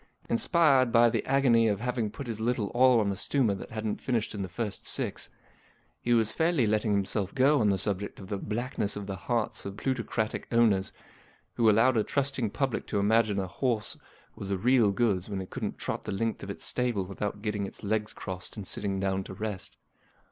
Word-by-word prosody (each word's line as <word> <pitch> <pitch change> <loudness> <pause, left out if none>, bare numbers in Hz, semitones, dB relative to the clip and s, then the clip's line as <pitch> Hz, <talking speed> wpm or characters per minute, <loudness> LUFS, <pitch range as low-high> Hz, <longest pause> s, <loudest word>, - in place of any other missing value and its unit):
Inspired 135 -1 +4
by 115 0 +5
the - - 0
agony 130 -4 +4
of 100 -2 0
having 120 -2 -1
put 135 - -7
his 115 -3 -4
little 115 -3 0
all 125 -1 +5
on 100 -2 +1
a - - -3
stumer 120 +1 +1
that 95 - -7
hadn't 110 -1 -3
finished 120 -4 -1
in 105 - -4
the 95 - -4
first 105 +3 -5
six, - - -3 0.7
he 120 - -1
was 115 -2 +3
fairly 160 -6 +2
letting 105 0 +1
himself 100 0 -1
go 140 +3 +4
on 105 - +3
the 100 - +2
subject 100 +1 -1
of 95 - -9
the 100 0 -3
blackness 110 -1 -2
of 105 -1 -5
the 95 -1 -4
hearts 115 +3 -2
of 100 0 -7
plutocratic 115 -4 -2
owners 110 -5 +3 0.6
who 115 -2 +4
allowed 115 +4 +4
a 110 - +3
trust¬ 140 +2 -1
ing 115 -4 0
public 135 +3 -2
to - - -1
imagine 105 0 +3
a 95 - 0
horse 110 +4 -2 0.4
was 95 - -7
the 100 - 0
real 120 0 +4
goods 100 -3 0
when 100 -2 -3
it 95 - -7
couldn't - - -4
trot - - -3
the - - -5
length 110 +3 -2
of 100 - -7
its 100 - -6
stable 120 -6 -1
without 105 +2 -4
getting 105 -2 -1
its - - -10
legs 105 +1 -1
crossed 95 +1 -7
and 105 - -5
sitting 100 0 -2
down 95 0 0
to 95 - -9
rest. 105 -2 -5
110 Hz, 210 wpm, -29 LUFS, 100-120 Hz, 0.7 s, by